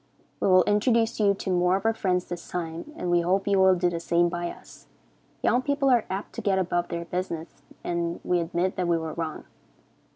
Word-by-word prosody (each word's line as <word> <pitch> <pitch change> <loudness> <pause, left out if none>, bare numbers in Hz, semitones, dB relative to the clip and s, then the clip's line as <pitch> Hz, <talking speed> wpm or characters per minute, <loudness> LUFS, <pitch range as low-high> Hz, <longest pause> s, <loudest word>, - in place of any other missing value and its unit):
We - - +1
will 185 -1 +6
introduce 225 +2 +2
you 200 -2 +3
to 195 - -4
more 180 0 +3
of 195 - -3
our 225 - +3
friends 185 -4 0
this 175 -1 -7
time, 170 - -5
and 180 - -3
we 175 0 +4
hope 190 +4 0
you 200 -1 +3
will 190 0 +6
do 180 0 +1
the 170 -1 -2
same 170 +1 +2
by 175 0 -3
us. - - -13 0.6
Young 245 - +3
people 280 0 +1
are 240 -3 +3
apt 195 +2 -5
to - - -5
get 195 -2 +1
above 175 -1 0
their 170 -1 -4
business, 165 -4 -5 0.2
and 170 -1 -2
we 180 - +1
admit 170 +2 -1
that 180 -1 0
we 170 -1 +2
were 160 -1 -4
wrong. 160 -1 -4
180 Hz, 220 wpm, -26 LUFS, 170-195 Hz, 0.6 s, will